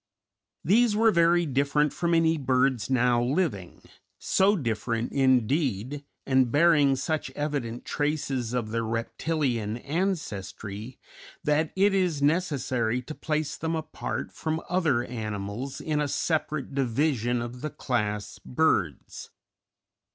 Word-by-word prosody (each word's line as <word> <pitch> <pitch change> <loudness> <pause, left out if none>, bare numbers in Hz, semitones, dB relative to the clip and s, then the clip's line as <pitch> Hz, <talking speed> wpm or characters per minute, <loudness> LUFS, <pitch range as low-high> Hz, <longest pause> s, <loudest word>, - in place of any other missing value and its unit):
These 215 +5 +4
were 225 +1 +5
very 170 0 +4
different 140 +1 +1
from 170 -1 +1
any 165 0 +3
birds 130 -5 +1
now 125 -2 +3
living 120 - -1 0.3
so 195 +2 +3
different, 115 - -2
indeed, 130 - +1 0.2
and 130 -3 +3
bearing 145 -2 +5
such 155 +4 -2
evident 140 -6 -3
traces 140 -5 -1
of 120 -3 -2
their 115 0 -1
reptilian 115 0 -1
ancestry, 125 - -4 0.5
that 155 0 +1
it 195 +1 +3
is 180 -6 +1
necessary 135 -7 0
to 155 - -7
place 150 -1 -2
them 165 +1 -2
apart 155 -1 -4
from 160 0 -2
other 160 -9 +1
animals 110 +2 -5
in 150 -1 -1
a 145 - 0
separate 155 -1 -1
division 125 -2 +1
of 120 +1 -6
the 155 - -3
class 105 -6 -2
birds. 100 - -1
140 Hz, 120 wpm, -27 LUFS, 120-160 Hz, 0.5 s, were